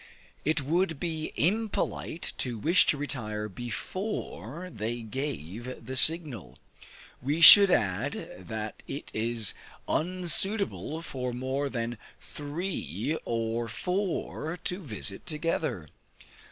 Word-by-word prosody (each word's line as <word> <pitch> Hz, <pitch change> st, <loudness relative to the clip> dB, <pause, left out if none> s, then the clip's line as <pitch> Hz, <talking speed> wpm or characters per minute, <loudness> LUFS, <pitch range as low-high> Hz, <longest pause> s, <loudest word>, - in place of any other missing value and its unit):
It 155 Hz, 0 st, +2 dB
would 165 Hz, +2 st, 0 dB
be 160 Hz, -2 st, -3 dB
impolite 195 Hz, -2 st, -1 dB
to 120 Hz, -3 st, 0 dB
wish 165 Hz, -, +4 dB
to 150 Hz, -, +3 dB
retire 110 Hz, -7 st, -3 dB
before 130 Hz, -, -5 dB
they 115 Hz, +3 st, -3 dB
gave 120 Hz, -, -5 dB
the 130 Hz, -, -5 dB
signal. 150 Hz, -, +3 dB, 0.6 s
We 145 Hz, +5 st, -1 dB
should 200 Hz, +4 st, +12 dB
add, 100 Hz, -, -1 dB
that 110 Hz, -1 st, -5 dB
it 140 Hz, -, -6 dB
is 115 Hz, -1 st, 0 dB, 0.3 s
unsuitable 180 Hz, 0 st, 0 dB
for 125 Hz, -5 st, -4 dB
more 130 Hz, +3 st, -2 dB
than 115 Hz, -3 st, -3 dB, 0.2 s
three 150 Hz, -, -4 dB
or 115 Hz, 0 st, -1 dB
four 180 Hz, -, -2 dB
to 180 Hz, -, -2 dB
visit 105 Hz, -, -5 dB
together. 150 Hz, -, -2 dB
140 Hz, 105 wpm, -29 LUFS, 115-170 Hz, 0.6 s, should